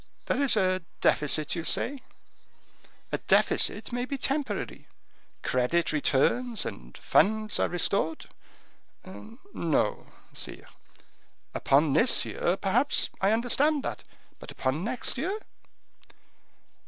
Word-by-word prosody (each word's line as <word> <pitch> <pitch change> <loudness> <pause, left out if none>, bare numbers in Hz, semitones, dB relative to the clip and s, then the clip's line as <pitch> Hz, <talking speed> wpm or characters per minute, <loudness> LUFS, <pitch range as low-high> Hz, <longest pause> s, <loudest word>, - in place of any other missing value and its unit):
There 255 - 0
is 275 -5 +4
a 185 -2 +1 0.2
deficit, 150 0 +1
you 170 - -3
say? 275 +9 0 1.1
A - - -1
deficit - - +2
may 245 +1 -2
be 275 +2 -4
temporary; 275 +2 -2 0.6
credit 130 +7 +1
returns 215 - +1
and - - -8
funds 215 +1 +2
are - - +1
restored." 175 -2 0 0.8
"No, 170 - -3 0.3
sire." - - -7 0.9
"Upon 140 +1 +2
this 230 - +4
year, 175 +2 -1
perhaps, 240 +10 +2
I 195 - +3
understand 270 +6 +2
that; - - -5 0.4
but - - -11
upon 135 +6 -2
next 240 +2 -2
year?" 375 +9 -2
205 Hz, 105 wpm, -27 LUFS, 155-255 Hz, 1.1 s, is